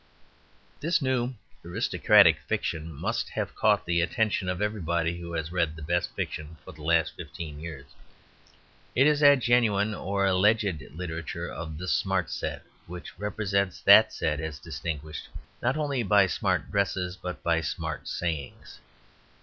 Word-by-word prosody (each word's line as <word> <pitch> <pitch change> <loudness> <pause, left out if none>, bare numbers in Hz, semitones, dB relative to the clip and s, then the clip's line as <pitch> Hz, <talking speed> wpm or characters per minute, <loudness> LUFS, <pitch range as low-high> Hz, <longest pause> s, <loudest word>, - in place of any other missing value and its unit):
This 165 +2 +1
new 130 -3 0 0.3
aristocratic - - +4
fiction 80 0 -2
must 70 - -2
have - - -3
caught - - +2
the 85 0 +2
attention 95 +2 0
of 90 0 -2
everybody 85 -5 -1
who 85 0 -7
has 80 -1 -3
read 85 -3 0
the 80 - -9
best 85 +3 -1
fiction 75 +1 -5
for - - -9
the 80 -3 -14
last 80 +1 +2
fifteen 75 -3 -8
years. 80 -4 -8 1.1
It 135 - +5
is 150 -1 +4
that 145 -2 +6
genuine 110 -4 +3
or 100 -1 -1
alleged 95 -2 +2
literature 85 0 -5
of 80 -2 -6
the 90 +3 -6
Smart 95 -1 0
Set - - -4 0.2
which 90 +1 -9
represents 100 -2 -1
that - - +8
set 75 -1 -1
as 80 -2 -4
distinguished, 80 -1 -6 0.3
not 125 +4 +1
only 145 -4 0
by 105 -2 +5
smart 90 - -1
dresses, 95 -2 0
but 90 -1 -7
by 85 -1 +2
smart 80 - -4
sayings. 80 -6 -4
90 Hz, 150 wpm, -27 LUFS, 80-105 Hz, 1.1 s, that